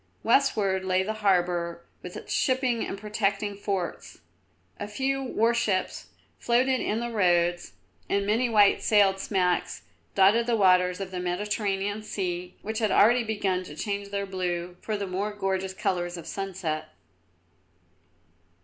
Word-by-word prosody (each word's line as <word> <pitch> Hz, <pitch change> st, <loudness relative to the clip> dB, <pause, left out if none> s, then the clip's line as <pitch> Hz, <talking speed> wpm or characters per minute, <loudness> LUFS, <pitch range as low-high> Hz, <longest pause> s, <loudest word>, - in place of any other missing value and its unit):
Westward 210 Hz, -7 st, +2 dB
lay 185 Hz, 0 st, +1 dB
the 215 Hz, +3 st, -2 dB
harbour 175 Hz, -3 st, +1 dB, 0.2 s
with 180 Hz, -, -8 dB
its -, -, -6 dB
shipping 255 Hz, -3 st, +1 dB
and -, -, -4 dB
protecting 205 Hz, -1 st, -1 dB
forts. 195 Hz, -3 st, -4 dB, 0.6 s
A 205 Hz, -, -4 dB
few 270 Hz, +6 st, -1 dB
warships 230 Hz, -6 st, 0 dB, 0.3 s
floated 255 Hz, +2 st, +2 dB
in 215 Hz, -, -1 dB
the 240 Hz, 0 st, -3 dB
roads, 175 Hz, -4 st, +1 dB, 0.4 s
and 200 Hz, 0 st, +1 dB
many 230 Hz, +4 st, +1 dB
white 205 Hz, -3 st, +5 dB
sailed 200 Hz, -3 st, +4 dB
smacks 180 Hz, -3 st, 0 dB, 0.3 s
dotted 210 Hz, +5 st, +4 dB
the 240 Hz, -, +2 dB
waters 180 Hz, -2 st, +4 dB
of 195 Hz, -1 st, -5 dB
the 180 Hz, -, -4 dB
Mediterranean 200 Hz, +2 st, -2 dB
Sea, 180 Hz, -4 st, -4 dB
which 220 Hz, +1 st, -3 dB
had 215 Hz, -2 st, +1 dB
already 240 Hz, +5 st, +5 dB
begun 200 Hz, -4 st, -1 dB
to 150 Hz, -5 st, -10 dB
change 200 Hz, +4 st, -3 dB
their 200 Hz, 0 st, -2 dB
blue 180 Hz, -2 st, -3 dB
for 215 Hz, -1 st, -2 dB
the 200 Hz, -, -3 dB
more 195 Hz, +3 st, -3 dB
gorgeous 190 Hz, -2 st, -2 dB
colours 175 Hz, -2 st, -2 dB
of 165 Hz, -, -9 dB
sunset. 165 Hz, -5 st, -4 dB
200 Hz, 140 wpm, -27 LUFS, 180-215 Hz, 0.6 s, white